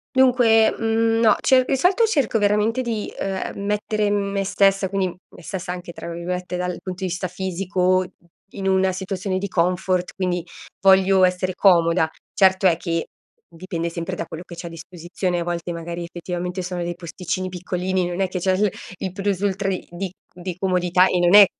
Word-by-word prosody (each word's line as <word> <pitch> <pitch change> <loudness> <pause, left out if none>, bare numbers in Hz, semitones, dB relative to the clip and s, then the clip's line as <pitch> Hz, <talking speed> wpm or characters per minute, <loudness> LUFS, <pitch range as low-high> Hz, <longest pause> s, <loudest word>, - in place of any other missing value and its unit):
Dunque, 245 -4 +5
mhmm, 225 0 +1
no, 220 -3 +6
cer 260 -1 +4
di 270 - +1
solito 370 - +3
cerco 280 - +1
veramente 210 +4 +2
di 230 -4 -3
uhm, - - -2
ehm, 190 0 -4
mettere 210 +1 0
me 200 -1 0
stessa, 195 -1 +2
quindi 195 -1 0 0.3
me - - -13
stessa 180 0 -5
anche 180 -1 -6
tra - - -7
virgolette 180 +1 -4
"dal 180 0 -3
punto 185 0 -6
di 185 - 0
vista 185 +1 -2
fisico," 185 0 0 0.5
in 195 -1 -4
una 190 0 +3
situazione 190 0 -3
di 200 +2 -2
comfort, 180 0 0
quindi 180 -2 -1 0.4
voglio 190 0 +5
essere 185 0 0
comoda. 170 -3 +4 0.2
Certo 190 0 +4
è 175 -3 +6
che 165 -1 -2 0.5
dipende 170 -1 -4
sempre 170 -1 -4
da 170 - -4
quello 160 0 -8
che 175 - -11
c'è 170 - -8
a 170 - -5
disposizione. 175 +2 -4
A - - -1
volte 175 0 -3
magari 170 +1 -5
effettivamente 175 +1 -4
sono 180 0 -4
dei 175 0 -3
posticini 180 +2 -4
piccolini, 180 0 -2
non 175 +1 -4
è 190 - +2
che 185 0 -4
c'è 185 +1 +1
il 200 +1 +2 0.3
il 190 - -4
plus-ultra 195 0 -1
di 185 - -4
di 180 +1 -4 0.2
di 180 0 -6
comodità 180 -1 +3
e 180 - +1
non 175 +2 +5
è 205 -1 +11
185 Hz, 185 wpm, -22 LUFS, 175-200 Hz, 0.5 s, è